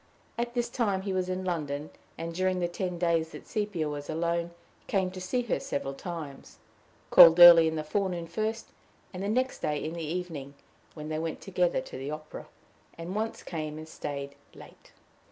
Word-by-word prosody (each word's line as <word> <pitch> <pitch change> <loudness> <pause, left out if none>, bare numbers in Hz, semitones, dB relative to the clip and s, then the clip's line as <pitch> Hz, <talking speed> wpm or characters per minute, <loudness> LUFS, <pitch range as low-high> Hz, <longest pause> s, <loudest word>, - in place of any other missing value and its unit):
At 240 +1 -3
this 240 -1 0
time 205 -6 -1
he 195 -1 -2
was 185 -1 -1
in 185 0 -3
London, 150 -4 -3 0.3
and, 165 0 -5
during 185 +1 0
the 175 - +1
ten 180 0 -4
days 165 -2 +1
that - - -10
Sepia 205 -7 -2
was 145 -1 -5
alone, 170 +1 -1 0.4
came 190 -2 0
to 185 0 -8
see 245 +7 -1
her 240 - -1
several 135 -1 -3
times 155 -3 -8 0.5
called 165 +1 +10
early 170 -2 +11
in 160 - -1
the 155 - -2
forenoon 180 +1 -2
first, 220 +5 -3 0.4
the 190 +2 -3
next 255 +4 0
day 150 - -1
in 155 - -4
the 170 - -5
evening, 155 -4 -5 0.4
when 155 -1 -7
they 155 0 -2
went 160 0 -3
together 180 -6 0
to 130 - -9
the 135 +2 -5
opera, 155 0 -7 0.5
and 170 +2 -6
once 220 +2 -3
came 155 -2 -5
and 155 0 -8
staid 140 -3 -6 0.2
late. - - -15
170 Hz, 185 wpm, -29 LUFS, 155-185 Hz, 0.5 s, early